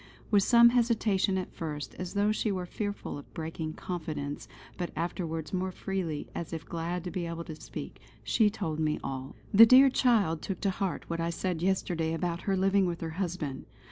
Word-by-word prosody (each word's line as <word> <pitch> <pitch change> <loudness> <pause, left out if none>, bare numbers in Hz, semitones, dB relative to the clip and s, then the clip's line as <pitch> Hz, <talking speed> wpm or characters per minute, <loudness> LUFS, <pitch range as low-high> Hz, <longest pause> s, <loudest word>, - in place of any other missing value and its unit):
With 205 -2 +6
some 235 +3 +7
hesitation 225 -5 +2
at 185 - -4
first, 150 -4 -5
as 185 +2 -5
though 205 +1 +3
she 215 0 0
were 185 -2 -2
fearful 205 -4 -4
of - - -14
breaking 160 -1 -4
confidence, 155 -6 -5 0.3
but 175 -1 -3
afterwards 165 -1 -3
more 185 0 -1
freely 180 -6 -3
as 170 - -5
if 160 - -5
glad 170 +1 -3
to 180 - -5
be 175 0 -3
able 170 0 -4
to 160 - -7
speak, - - -8 0.2
she 220 -3 +3
told 165 -7 -3
me 155 -1 +1
all: 135 -1 -5 0.2
"The 225 +3 +10
dear 265 +3 +8
child 210 - +3
took 190 -3 -4
to 195 - +2
heart 190 0 -3
what 170 0 -3
I 165 0 0
said 170 0 -2
yesterday 170 -3 0
about 170 0 -2
her 195 - +2
living 195 0 +3
with 170 -1 -3
her 165 -1 -3
husband. 170 -7 -3
175 Hz, 195 wpm, -30 LUFS, 160-195 Hz, 0.3 s, The